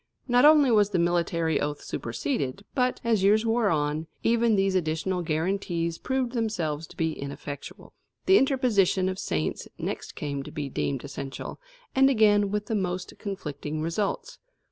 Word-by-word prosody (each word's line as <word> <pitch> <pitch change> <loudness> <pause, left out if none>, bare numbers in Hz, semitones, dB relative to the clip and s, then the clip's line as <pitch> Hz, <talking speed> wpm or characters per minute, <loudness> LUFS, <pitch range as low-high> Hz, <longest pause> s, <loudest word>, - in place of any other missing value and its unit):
Not 245 +1 +5
only 295 -4 +7
was 210 -2 +4
the 190 - 0
military 170 -2 +1
oath 145 0 -3
superseded; 135 - -3
but, 255 -2 +1
as 230 -4 +2
years 210 +3 +4
wore 225 -2 +2
on, 150 0 0 0.2
even 230 -1 +3
these 195 -1 +2
additional 180 +1 0
guarantees 170 0 -1
proved 260 -2 -1
themselves 170 - -2
to 180 - -16
be 160 -3 0
ineffectual. 140 0 -8 0.3
The 380 +1 +6
interposition 225 -9 +2
of 185 0 -4
saints 80 0 -2
next - - -5
came 140 -2 -3
to - - -9
be 145 -2 -4
deemed 135 0 -2
essential, 140 -1 -6 0.3
and 270 0 +5
again 210 -5 +4
with 210 +1 -2
the 225 - -3
most 185 -3 -2
conflicting 155 -6 -4
results. 200 - -2
185 Hz, 155 wpm, -27 LUFS, 155-220 Hz, 0.3 s, only